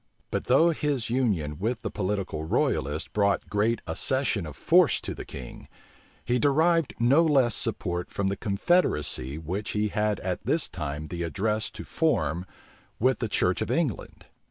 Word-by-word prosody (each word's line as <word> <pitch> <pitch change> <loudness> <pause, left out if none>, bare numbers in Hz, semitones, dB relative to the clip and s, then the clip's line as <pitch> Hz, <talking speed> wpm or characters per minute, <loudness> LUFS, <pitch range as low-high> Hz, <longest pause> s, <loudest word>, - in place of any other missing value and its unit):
But - - -2
though 160 +7 +5
his 145 -7 -2
union 95 - 0
with 110 +3 -2
the - - -3
political 95 -6 -2
royalists 75 -1 0
brought 100 -1 0
great 110 +3 +1
accession 130 - 0
of 75 - -9
force - - +4
to - - -5
the - - -8
king, 65 -3 -9 0.6
he 125 +1 +1
derived 160 +3 +2
no 135 +8 +5
less 135 -7 +3
support 90 -6 -1
from 100 - -2
the 100 - 0
confederacy 100 - 0
which 90 +6 -4
he 105 0 0
had 105 0 0
at 90 -1 -2
this 145 +8 +1
time 75 -1 -5
the 85 -1 -4
address 105 +5 -1
to - - -9
form 90 - 0 0.5
with 130 +3 +2
the 115 - -2
church 90 -2 +1
of - - -2
England. 155 - -2
105 Hz, 160 wpm, -27 LUFS, 85-130 Hz, 0.6 s, though